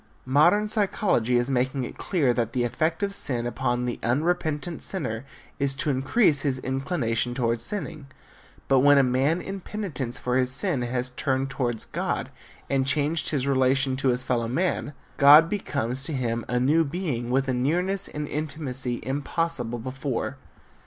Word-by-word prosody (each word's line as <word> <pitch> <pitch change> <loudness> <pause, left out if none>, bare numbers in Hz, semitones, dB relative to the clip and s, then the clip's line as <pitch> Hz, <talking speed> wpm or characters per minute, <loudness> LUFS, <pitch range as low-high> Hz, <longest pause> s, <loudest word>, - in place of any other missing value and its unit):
Modern 175 +11 +4
psychology 195 - +1
is 120 0 +1
making 130 0 0
it - - -6
clear 145 -10 +1
that 115 -2 -1
the 125 -2 +1
effect 160 - -1
of 200 0 -1
sin 125 -10 0
upon 120 0 -1
the 120 - -3
unrepentant 155 +4 -1
sinner 130 - -3 0.3
is 140 -1 +1
to 145 +1 0
increase 145 - +2
his 140 -3 0
inclination 130 -3 -1
toward 115 -2 0
sinning. 155 - -5 0.6
But 135 -1 +4
when 145 +2 +6
a 140 - +6
man 135 +7 +1
in 195 0 -5
penitence 160 - -4
for 125 0 -1
his 130 -1 +1
sin 140 0 +1
has 125 +1 -2
turned 130 +1 -1
toward 120 -5 -2
God - - -2 0.4
and 135 -1 0
changed 150 +3 +1
his 140 -4 -1
relation 135 0 +2
to 135 - 0
his 125 0 +1
fellow 120 -3 0
men, 150 +3 -1 0.2
God 150 +3 +8
becomes 130 - -2
to 155 - -4
him 120 -3 -2
a 125 0 0
new 150 +6 +3
Being 140 -7 -3
with 135 +2 +1
a 130 - +1
nearness 180 +10 0
and 150 0 -5
intimacy 135 -5 -3
impossible 140 -2 -2
before! 130 +2 -3
135 Hz, 165 wpm, -25 LUFS, 125-155 Hz, 0.6 s, God